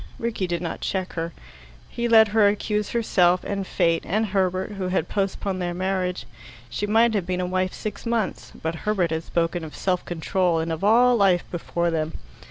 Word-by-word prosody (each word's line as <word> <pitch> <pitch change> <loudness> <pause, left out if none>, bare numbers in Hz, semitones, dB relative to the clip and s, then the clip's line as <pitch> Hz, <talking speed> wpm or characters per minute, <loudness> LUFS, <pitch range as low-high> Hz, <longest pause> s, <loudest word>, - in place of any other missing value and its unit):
Rickie 225 -5 -2
did 175 0 -2
not 170 - -4
check 190 -1 -2
her. 165 0 -3 0.6
He 235 0 -2
let 220 -2 +6
her 210 -1 +4
accuse 210 0 0
herself, 185 -6 +2
and 195 -2 -3
fate, 165 0 +1
and 215 +4 0
Herbert, 190 -1 0
who 195 -2 -3
had 180 -3 0
postponed 195 -1 -2
their 175 -1 -2
marriage. 185 -4 -1 0.5
She 205 - -2
might 225 +2 +4
have 195 -5 -1
been 180 0 -1
a 180 - 0
wife 185 +1 0
six 210 -2 -6
months; 230 -3 -2
but 160 +1 -1
Herbert 195 -6 0
had 160 0 -1
spoken 170 0 -1
of 155 - -8
self 180 -2 0
control 175 +1 0
and 165 +1 -1
of 160 +3 -4
all 240 +4 +5
life 195 -5 +3
before 170 0 -1
them. 160 -1 -1
185 Hz, 190 wpm, -24 LUFS, 175-210 Hz, 0.6 s, let